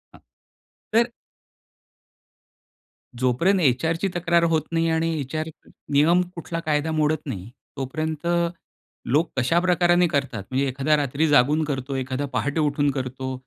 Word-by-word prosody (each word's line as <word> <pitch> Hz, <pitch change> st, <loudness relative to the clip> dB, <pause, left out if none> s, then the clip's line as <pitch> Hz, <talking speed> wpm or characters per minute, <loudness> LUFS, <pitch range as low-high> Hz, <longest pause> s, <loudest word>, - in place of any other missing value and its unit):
हं. -, -, -16 dB, 0.7 s
तर; 230 Hz, +2 st, +4 dB, 2.1 s
जोपर्यंत 130 Hz, +11 st, +2 dB
एचआरची 160 Hz, +6 st, +1 dB
तक्रार 170 Hz, 0 st, +2 dB
होत 165 Hz, -2 st, +2 dB
नाही 165 Hz, 0 st, +1 dB
आणि 165 Hz, 0 st, +1 dB
एचआर 155 Hz, +4 st, -3 dB, 0.4 s
नियम 165 Hz, +5 st, +5 dB
कुठला 170 Hz, 0 st, -4 dB
कायदा 155 Hz, -1 st, 0 dB
मोडत 155 Hz, 0 st, 0 dB
नाही 105 Hz, -7 st, -6 dB, 0.3 s
तोपर्यंत 155 Hz, +4 st, -3 dB, 0.8 s
लोक 155 Hz, +6 st, +2 dB
कशा 130 Hz, +7 st, +3 dB
प्रकाराने 175 Hz, 0 st, +3 dB
करतात 135 Hz, -, -2 dB
म्हणजे 130 Hz, +2 st, 0 dB
एखादा 135 Hz, +4 st, +1 dB
रात्री 145 Hz, +2 st, 0 dB
जागून 150 Hz, +2 st, +4 dB
करतो, 135 Hz, -2 st, -3 dB
एखादा 130 Hz, +1 st, -2 dB
पहाटे 145 Hz, +4 st, -1 dB
उठून 145 Hz, -1 st, +1 dB
करतो. 130 Hz, -1 st, -4 dB
150 Hz, 125 wpm, -24 LUFS, 135-165 Hz, 2.1 s, नियम